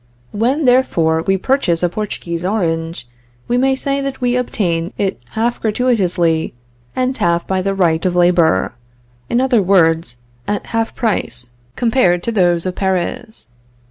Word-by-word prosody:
"When, 255 +8 0
therefore, 170 -11 +3
we 195 +3 +1
purchase 190 -7 0
a 175 - +3
Portuguese 175 -4 -4
orange, 165 - -2 0.4
we 240 - 0
may 265 +2 +2
say 275 +1 -1
that 275 -1 -4
we 245 -1 +1
obtain 175 -9 -1
it 195 -11 -2
half 230 +2 -1
gratuitously 185 - +1 0.4
and 255 +1 0
half 170 -4 +1
by 190 -1 -1
the 195 +1 -1
right 165 -4 +2
of 180 -2 0
labor; 175 - +3 0.6
in 240 - +2
other 255 -4 +3
words, 165 -8 +2 0.3
at 205 0 -2
half 225 0 -1
price 120 - -1 0.2
compared 220 -8 +2
to 235 - -1
those 175 -5 +2
of 185 - -1
Paris. 190 - -2
195 Hz, 145 wpm, -17 LUFS, 170-240 Hz, 0.6 s, therefore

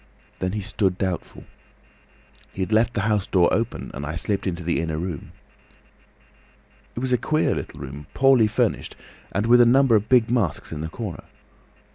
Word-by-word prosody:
Then 90 +1 -2
he 105 - -2
stood 95 -2 -1
doubtful. 95 -3 -4 1.1
He 95 - -2
had 100 - -3
left 115 +2 +2
the 105 - +1
house 105 -1 0
door 90 -3 +3
open 115 +1 -2
and 70 - -6
I 80 +2 -4
slipped 100 +4 -1
into 90 -1 -3
the 85 +1 0
inner 80 -1 -3
room. 85 -2 -5 1.6
"It 120 - -4
was 130 -1 0
a 125 - +3
queer 155 0 +1
little - - -6
room, 70 +1 -8
poorly 135 -5 +5
furnished 105 - -1 0.4
and 100 +3 -1
with 120 +1 +6
a - - +7
number 130 -1 +5
of 105 0 +1
big 120 -3 +4
masks 115 - -1
in 75 - -5
the 80 - -4
corner. 105 -1 -7
100 Hz, 180 wpm, -23 LUFS, 85-115 Hz, 1.6 s, a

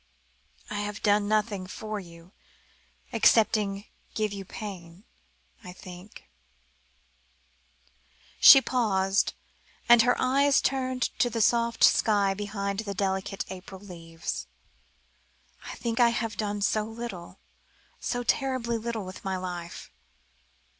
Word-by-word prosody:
I 205 - -2
have 205 0 -5
done 205 -1 +3
nothing 210 -3 0
for 215 +2 -5
you, 170 -1 -14 0.8
excepting 210 -3 +3 0.3
give 215 -2 -1
you 200 -1 -6
pain. 185 -3 -9 0.6
I 180 -1 -9
think 180 +2 -12 1.4
" - - -33
she 270 - +10
paused, 200 -6 +1 0.5
and 240 -1 +8
her 245 +2 +3
eyes 275 +2 +3
turned 255 -2 -1 0.2
to 245 - +3
the 230 - -3
soft 235 +1 +2
sky 200 -3 +4
behind 200 0 -4
the 200 -3 -4
delicate 195 0 -2
April 190 0 -9
leaves 165 -4 -7 1.2
"I - - -6
think 230 -1 -3
I 240 -1 +6
have 225 -2 -3
done 205 -1 -3
so 215 +1 +2
little, 220 -6 -8 0.6
so 245 -1 -2
terribly 245 -2 0
little 225 -2 -4
with 185 0 -10
my 190 -1 -2
life." 175 -2 -7
205 Hz, 120 wpm, -27 LUFS, 190-230 Hz, 1.4 s, she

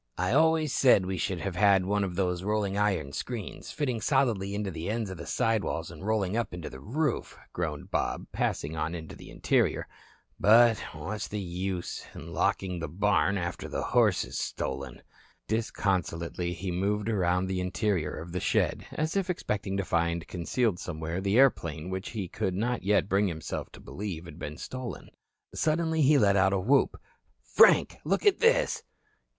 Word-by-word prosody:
"I 90 +5 0
always 160 -1 +3
said 125 -10 +5
we 95 0 -2
should 95 -2 -2
have 100 -3 -3
had 100 -1 +4
one 100 +1 +1
of 90 -3 -3
those 90 -2 0
rolling 100 0 0
iron 95 -9 0
screens, 120 - -5
fitting 130 -7 -2
solidly 115 -8 +1
into 100 -2 -2
the 85 +2 -5
ends 110 -3 -2
of 95 - -6
the 85 - -8
side 115 -2 +1
walls - - -3
and - - -11
rolling 105 -2 0
up 115 -6 -1
into 85 -3 -7
the 65 - -9
roof," 135 - -2 0.2
groaned - - -4
Bob, - - -1
passing 75 +3 -1
on 80 +2 -2
into 80 -2 -8
the - - -12
interior. - - +1 0.5
"But 115 +2 +6
what's 95 +8 -4
the 105 - -4
use 90 0 -4
locking 90 -2 -1
the 85 - -3
barn 100 +4 +2
after 85 -1 -4
the - - -2
horse - - +3
is - - -5
stolen." 70 -2 -4 0.4
Disconsolately 90 -5 -1
he 90 +2 -4
moved 100 +4 0
around 90 -4 +1
the 95 -1 -2
interior 90 -3 -1
of 85 +1 -7
the 90 - -2
shed, - - 0
as 155 +3 -1
if 195 -2 0
expecting 100 - -2
to 100 - -1
find 85 -1 0
concealed 95 +3 0
somewhere 80 +1 -4
the 100 +3 +1
airplane 85 - +2
which 95 +1 -4
he 105 -5 -4
could 95 0 -2
not 120 +5 -1
yet 100 0 +2
bring 100 +1 +2
himself 80 -4 -5
to - - -11
believe 90 -5 -6
had 85 0 -11
been 75 -2 -6
stolen. 130 -1 -7 0.4
Suddenly 160 0 +1
he 145 +1 +5
let 100 -5 +4
out 95 0 +4
a 100 - +2
whoop. 130 +9 +2 0.4
"Frank, - - +5
look - - 0
at 405 -2 +5
this." - - +3
100 Hz, 180 wpm, -29 LUFS, 90-110 Hz, 0.5 s, But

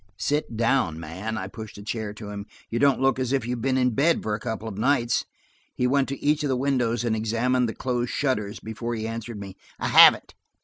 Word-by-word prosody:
"Sit 145 -4 -1
down, 115 -9 +1
man," 95 +8 -5
I 95 - -3
pushed 110 +1 -9
a 100 - -9
chair 110 0 -3
to 105 0 -9
him. 100 0 -7 0.2
"You 115 - -1
don't 140 0 +4
look 135 0 +2
as 130 -1 -1
if 135 -4 0
you 120 - -3
have 125 -2 -3
been 130 +1 +1
in 125 -1 +2
bed 150 +9 +2
for 105 - -1
a 105 - -2
couple 110 +1 -4
of 105 - -6
nights." 120 -1 +2 0.5
He 125 - 0
went 135 +1 +2
to 140 - -4
each 150 +1 +1
of 145 - 0
the 130 - +1
windows 125 -4 0
and 115 -2 0
examined 115 +3 +1
the - - -6
closed 125 -1 -2
shutters 110 -7 -1
before 115 +2 -5
he 110 0 -3
answered 115 -1 -6
me. 100 -1 -8 0.2
"I - - -1
haven't. - - +7
115 Hz, 235 wpm, -25 LUFS, 110-130 Hz, 0.5 s, haven't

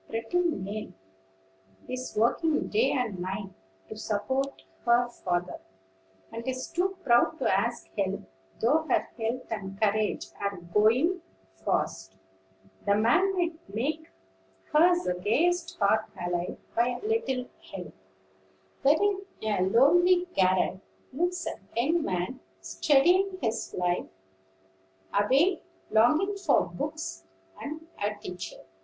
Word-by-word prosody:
Pretty 225 +10 -1
Nell 215 - -2 0.9
is 255 -2 -5
working 300 +8 +2
day 445 +3 +3
and 235 -8 -1
night, 195 +2 -4 0.4
to - - -7
support 260 +6 -2 0.2
her 240 +1 +4
father, 180 -6 -3 0.7
and 230 +2 -7
is 255 0 -3
too 375 +2 0
proud 245 +5 +4
to - - 0
ask 235 +5 +1
help, 195 -2 -1 0.4
though 270 +8 +4
her - - +2
health 235 +2 -2
and 195 -3 -5
courage 215 0 +1
are 200 -1 -2
going 220 - +2 0.4
fast. 95 0 -1 0.7
The 200 - +3
man 305 - +3
might 340 - -2
make 290 +10 -2 0.6
hers 350 +3 +5
the 180 - 0
gayest 335 - +1
heart 215 +1 +3
alive, 175 0 -2 0.2
by 245 +1 +1
a - - -10
little 425 - 0 0.3
help. - - -7 0.9
There 285 +3 +5
in 405 -1 +2 0.2
a 210 -3 +1
lonely 350 - +5
garret 185 0 +2 0.3
lives 355 +5 -1
a - - -4 0.2
young 320 +8 +2
man 180 -1 -2 0.2
studying 310 - +3
his 230 -2 -2
life 180 -1 0 1.1
away, 270 - +3 0.3
longing 310 - +4
for 360 -7 +3
books 95 - -5 0.3
and 315 +2 -6 0.2
a 210 +1 0
teacher. 180 -3 -7
235 Hz, 120 wpm, -28 LUFS, 200-325 Hz, 1.1 s, hers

